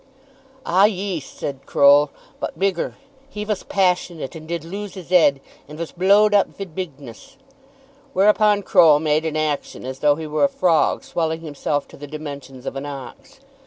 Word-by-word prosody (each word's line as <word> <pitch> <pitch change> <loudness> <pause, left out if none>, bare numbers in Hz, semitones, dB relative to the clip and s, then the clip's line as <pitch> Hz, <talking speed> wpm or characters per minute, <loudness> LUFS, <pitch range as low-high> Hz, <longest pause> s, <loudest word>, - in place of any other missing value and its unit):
"Ah; 185 +3 +4
yees," 190 -7 -2
said 135 -2 -7
Croll, 145 +1 +5 0.3
"but - - -5
bigger. 190 -3 -1 0.3
He 210 -6 -5
vas 210 -2 -2
passionate, 180 -6 -1
and 155 -1 -10
did 170 -1 -4
lose 200 +4 -7
his 185 -2 -10
'ead; 155 -6 +5 0.3
and 150 +1 -10
vas 170 0 -5
blow'd 200 +4 +4
up 205 - +4
vid 195 -5 -7
bigness." 160 - -8 0.8
Whereupon 210 0 +3
Croll 155 -5 +6
made 155 +1 +1
an 155 -1 -3
action 150 -4 -3
as 130 0 -6
though 145 -1 +4
he 160 +1 -6
were 150 -1 -1
a - - +1
frog 170 -4 +2
swelling 160 -1 -2
himself 145 -2 -3
to - - -14
the 145 - -9
dimensions 140 -3 -8
of - - -4
an 135 +1 -5
ox. 140 - -10
160 Hz, 170 wpm, -21 LUFS, 145-190 Hz, 0.8 s, Croll